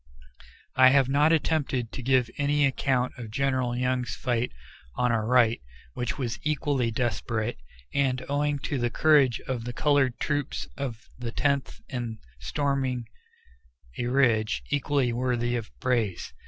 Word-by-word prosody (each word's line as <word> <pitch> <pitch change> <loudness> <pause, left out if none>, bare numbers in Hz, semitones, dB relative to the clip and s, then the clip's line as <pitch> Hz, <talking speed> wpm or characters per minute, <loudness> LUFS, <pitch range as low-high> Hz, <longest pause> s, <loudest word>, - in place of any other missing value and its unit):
I 130 0 +8
have 135 -1 +4
not 145 +3 +4
attempted 145 -7 0
to - - -6
give 130 -1 +3
any 145 0 +3
account 130 -2 +1
of 115 -2 -6
General 130 0 0
Young's 125 0 -1
fight 120 0 -1 0.4
on 125 -1 +2
our 110 -2 0
right, 120 -2 +4 0.3
which 120 - -3
was 125 -5 -3
equally 145 -5 0
desperate, 115 -1 -2 0.4
and, 130 -2 +1
owing 145 +1 0
to 140 - -1
the 120 0 +1
courage 140 -3 +4
of 125 -3 -4
the 120 +1 -5
colored 140 -2 +2
troops 145 -2 -2
of 120 -5 -5
the 120 -2 -4
Tenth 140 +1 -1
in 120 -3 -4 0.2
storming 130 - -1 0.9
a 120 - -1
ridge, 115 - +2
equally 140 -3 +1
worthy 120 -1 0
of 115 -2 -4
praise. 115 -8 -1
125 Hz, 140 wpm, -27 LUFS, 120-140 Hz, 0.9 s, I